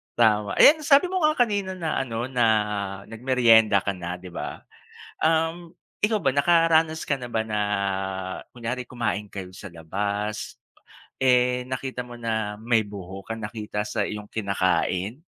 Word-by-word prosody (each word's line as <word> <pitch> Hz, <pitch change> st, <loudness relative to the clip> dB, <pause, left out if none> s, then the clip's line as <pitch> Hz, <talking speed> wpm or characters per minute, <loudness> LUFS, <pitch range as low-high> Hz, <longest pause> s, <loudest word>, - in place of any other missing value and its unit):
Tama, 105 Hz, -3 st, +3 dB
ayan 315 Hz, +2 st, +8 dB
sabi 285 Hz, +4 st, +5 dB
mo 375 Hz, -, 0 dB
nga 305 Hz, 0 st, +4 dB
kanina 205 Hz, -5 st, +1 dB
na 165 Hz, -4 st, -2 dB
ano 120 Hz, -3 st, -3 dB
na 125 Hz, -2 st, 0 dB, 0.6 s
nagmeryenda 115 Hz, -3 st, +4 dB
ka 100 Hz, -, 0 dB
na 90 Hz, 0 st, -5 dB
'di 90 Hz, -, -11 dB
ba. -, -, -6 dB, 0.6 s
Um, 165 Hz, +2 st, 0 dB, 0.3 s
ikaw 215 Hz, -1 st, 0 dB
ba 140 Hz, -, +3 dB
nakaranas 160 Hz, +1 st, +3 dB
ka 140 Hz, -, 0 dB
na 125 Hz, -2 st, -7 dB
ba 110 Hz, -1 st, 0 dB
na 105 Hz, -1 st, -2 dB, 0.9 s
kunyari 125 Hz, +1 st, -4 dB
kumain 115 Hz, -4 st, -2 dB
kayo 95 Hz, -2 st, -7 dB
sa 100 Hz, +1 st, -9 dB
labas, 100 Hz, +6 st, -3 dB, 0.6 s
eh, 125 Hz, -1 st, +3 dB
nakita 130 Hz, -1 st, -4 dB
mo 120 Hz, -1 st, -10 dB
na 110 Hz, -3 st, -2 dB
may 115 Hz, 0 st, +3 dB
buhok 100 Hz, +1 st, -7 dB
ka -, -, -5 dB
nakita 105 Hz, -1 st, -4 dB
sa 105 Hz, -1 st, -1 dB
iyong 105 Hz, -1 st, -6 dB
kinakain? 100 Hz, -, -1 dB
115 Hz, 150 wpm, -25 LUFS, 105-140 Hz, 0.9 s, ayan